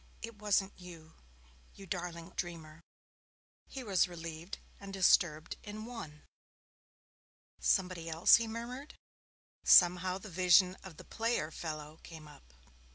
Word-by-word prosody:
'It 230 0 -7
wasn't 205 -1 +1
you, 165 -3 -12 0.6
you 195 - -11
darling 175 -2 -5
old 185 - -17
dreamer.' 165 -3 -6 0.9
He 265 - -7
was 195 -6 +2
relieved 165 +1 -8 0.2
and 200 -1 -9
disturbed 175 -4 +2
in 215 +1 -8
one. 160 -12 -9 1.4
'Somebody 180 -4 0
else?' 165 +1 +6
he 230 -1 -3
murmured. 240 +6 -7 0.7
Somehow 180 +1 +5
the 195 - -10
vision 180 +1 +5
of 180 -5 -11
the - - -12
player 225 -9 -2
fellow 155 -1 -7
came 160 -2 -11
up. - - -17
180 Hz, 125 wpm, -33 LUFS, 160-200 Hz, 1.4 s, else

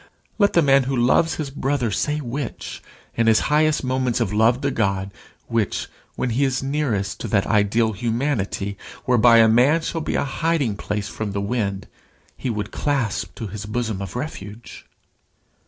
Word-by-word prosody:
Let 200 -1 +4
the 170 - +4
man 135 -2 +4
who 135 +1 -1
loves 130 +7 +3
his 145 -3 -4
brother 135 -4 -1
say 150 +8 0
which, 135 -2 -5 0.3
in 115 -1 +1
his 110 -1 +5
highest 155 0 +3
moments 130 -2 0
of 110 -4 -1
love 115 +4 +3
to 140 -1 0
God, 100 -4 -1 0.3
which, 115 -4 -1 0.3
when 125 - -1
he 130 +5 +1
is 135 -1 0
nearest 135 -9 -1
to - - -4
that 100 -1 +1
ideal 110 +2 +2
humanity 110 -3 -2 0.3
whereby 120 -1 +5
a 115 -1 +7
man 130 +9 +4
shall 165 0 -3
be - - -2
a - - +1
hiding 140 -4 0
place 105 0 -3
from 105 -2 -4
the 100 - -1
wind, 100 -2 -2 0.5
he 130 - -4
would 105 -3 -3
clasp 135 -8 -1
to 115 - -5
his 105 +1 -6
bosom 110 -3 -2
of 95 +1 -6
refuge. 115 -5 -7
120 Hz, 170 wpm, -22 LUFS, 105-140 Hz, 0.5 s, a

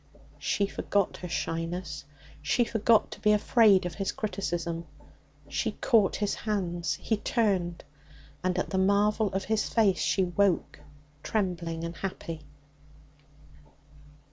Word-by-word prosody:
She 200 - +1
forgot 200 -1 -1
her 180 - -7
shyness; 165 -2 -3 0.4
she 240 +11 +2
forgot 225 -1 +2
to - - -8
be 210 - +4
afraid 210 -2 +5
of 175 - -3
his 195 +2 -2
criticism; 170 -5 -3 0.6
she - - -1
caught 220 -6 +3
his 205 -1 -1
hands. 175 -7 -2
He 220 +6 -1
turned. 195 -7 0 0.6
And 185 0 0
at 185 - -2
the 190 - +1
marvel 205 +2 +2
of 190 0 -2
his 220 +1 0
face 210 -5 +3
she 190 - +2
woke, 185 +1 +1 0.4
trembling 170 -5 -2
and 170 0 -4
happy. 165 -4 -5
190 Hz, 125 wpm, -28 LUFS, 170-210 Hz, 0.6 s, afraid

